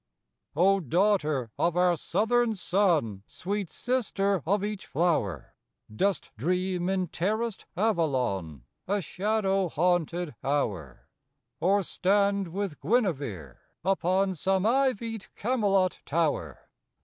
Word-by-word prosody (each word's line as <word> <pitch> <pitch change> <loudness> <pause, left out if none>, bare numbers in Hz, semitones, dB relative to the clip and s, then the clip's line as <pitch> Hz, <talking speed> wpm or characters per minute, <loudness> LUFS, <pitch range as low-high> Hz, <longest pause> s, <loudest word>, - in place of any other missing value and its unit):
O 195 +5 +4
daughter 155 - +1
of 175 0 +1
our 180 -1 +4
Southern 225 +7 +1
sun, 170 - +1
Sweet 200 -1 -4
sister 200 -7 0
of 200 +2 +2
each 210 -1 -4
flower, 130 - 0 0.4
Dost 195 - 0
dream 180 - 0
in 190 -2 0
terraced 215 +6 -2
Avalon 125 - 0 0.2
A 205 +2 +1
shadow 195 -1 0
haunted 175 0 0
hour? 100 - -2 0.5
Or 195 +3 +3
stand 200 +2 +1
with 190 -2 -4
Guinevere 140 - -1 0.3
upon 190 0 +2
Some 190 +3 0
ivied 230 -4 0
Camelot 200 -6 +1
tower? 145 - -1
185 Hz, 100 wpm, -28 LUFS, 155-200 Hz, 0.5 s, O